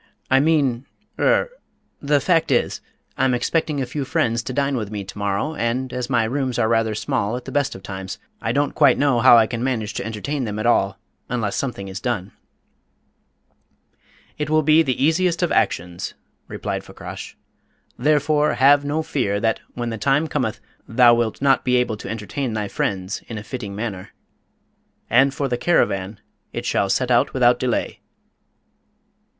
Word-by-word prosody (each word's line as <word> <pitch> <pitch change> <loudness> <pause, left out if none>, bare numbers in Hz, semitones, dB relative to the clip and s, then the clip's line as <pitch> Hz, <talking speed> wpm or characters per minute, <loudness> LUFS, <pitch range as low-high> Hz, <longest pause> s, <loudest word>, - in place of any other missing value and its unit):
I 130 - +6
mean 140 -5 +1 0.3
er - - +2 0.5
the 145 0 +2
fact 165 +2 +2
is, 120 - +1 0.4
I'm 130 -1 +3
expecting 150 +4 0
a 135 - -1
few 140 +4 -4
friends 115 -3 0
to 130 - -6
dine 140 +1 0
with 110 -5 -3
me 105 -2 -5
to 100 +2 -10
morrow, 100 +10 -1
and, 125 -1 -2
as 125 0 -3
my 120 -3 +2
rooms 130 +1 -1
are 110 - +2
rather 115 -1 +1
small 120 -2 -1
at 125 - -9
the 135 - -7
best 145 0 0
of 95 - -11
times, 95 -1 -6 0.2
I - - -1
don't 145 +1 0
quite 145 -4 +4
know 140 -4 +2
how 120 0 +8
I 115 - +6
can 115 +1 -4
manage 115 -5 -1
to - - -3
entertain 115 +7 -3
them 105 -1 -4
at 110 - -3
all 100 -4 +2 0.3
unless 115 -5 -1
something 120 -8 -3
is 95 0 -6
done." 105 -7 -3 2.1
"It 150 -1 -2
will 155 0 +3
be 155 +2 +5
the 130 -5 0
easiest 170 +3 +2
of 175 - +1
actions," 85 +1 -1 0.3
replied - - -4
Fakrash; - - -9 0.6
"therefore, 150 +2 +2
have 140 +2 +5
no 150 +3 -1
fear 100 -10 -1
that, 110 +1 0 0.2
when 120 -1 -3
the 110 - -5
time 140 +6 +2
cometh, 125 -8 -2 0.3
thou 120 0 +6
wilt 115 +2 -1
not 135 -1 +4
be 125 -1 +2
able 125 -3 +1
to - - -8
entertain 115 +3 -3
thy 105 -2 -2
friends 95 -1 -2
in 115 - -6
a 105 - -6
fitting 110 -4 -6
manner. 100 -4 -5 1.0
And 135 +3 +5
for 140 0 -2
the 125 -2 -1
caravan, 100 - +1 0.3
it - - -4
shall 100 - +1
set 125 +6 +1
out 120 - +3
without 125 -1 +4
delay." 125 -2 -1
125 Hz, 180 wpm, -22 LUFS, 110-140 Hz, 2.1 s, how